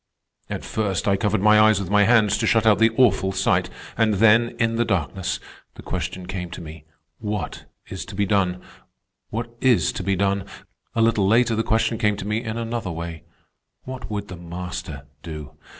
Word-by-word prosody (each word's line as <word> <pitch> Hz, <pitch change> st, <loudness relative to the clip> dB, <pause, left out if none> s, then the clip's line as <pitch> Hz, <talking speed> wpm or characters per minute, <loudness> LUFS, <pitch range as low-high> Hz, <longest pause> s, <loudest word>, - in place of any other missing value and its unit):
At -, -, -5 dB
first 100 Hz, -5 st, -1 dB
I 100 Hz, -, +4 dB
covered 100 Hz, -1 st, 0 dB
my 105 Hz, 0 st, +6 dB
eyes 110 Hz, -1 st, +5 dB
with 100 Hz, -1 st, -5 dB
my 105 Hz, 0 st, +5 dB
hands 110 Hz, -3 st, +4 dB
to 115 Hz, -, +1 dB
shut 115 Hz, 0 st, +3 dB
out 105 Hz, -3 st, +5 dB
the 115 Hz, -, +6 dB
awful 120 Hz, -7 st, +3 dB
sight, -, -, +1 dB, 0.3 s
and 110 Hz, -2 st, +2 dB
then, 115 Hz, +3 st, +4 dB
in 115 Hz, -1 st, +1 dB
the 120 Hz, -, +3 dB
darkness, 95 Hz, -2 st, -2 dB, 0.4 s
the -, -, -11 dB
question 90 Hz, +1 st, -4 dB
came 90 Hz, -1 st, -5 dB
to 85 Hz, -, -8 dB
me: 80 Hz, -2 st, -10 dB, 0.3 s
What 105 Hz, -2 st, -4 dB, 0.2 s
is 95 Hz, -, -6 dB
to 115 Hz, -, -10 dB
be 100 Hz, +1 st, +1 dB
done? 90 Hz, -2 st, 0 dB, 0.7 s
What 115 Hz, +1 st, -4 dB
is 125 Hz, -3 st, +3 dB
to -, -, -5 dB
be 100 Hz, 0 st, 0 dB
done? 100 Hz, 0 st, 0 dB, 0.5 s
A 115 Hz, -, +3 dB
little 110 Hz, -4 st, +3 dB
later 115 Hz, +2 st, +3 dB
the 110 Hz, -, +1 dB
question 115 Hz, 0 st, 0 dB
came 105 Hz, -2 st, +1 dB
to 100 Hz, -, -6 dB
me 105 Hz, +3 st, -1 dB
in 110 Hz, -1 st, -4 dB
another 115 Hz, -3 st, -3 dB
way: 85 Hz, -1 st, -6 dB, 0.6 s
What 130 Hz, -2 st, -7 dB
would 105 Hz, -1 st, -4 dB
the 95 Hz, -, -8 dB
Master 85 Hz, -4 st, -7 dB, 0.2 s
do? 75 Hz, -3 st, -8 dB
105 Hz, 195 wpm, -23 LUFS, 95-115 Hz, 0.7 s, my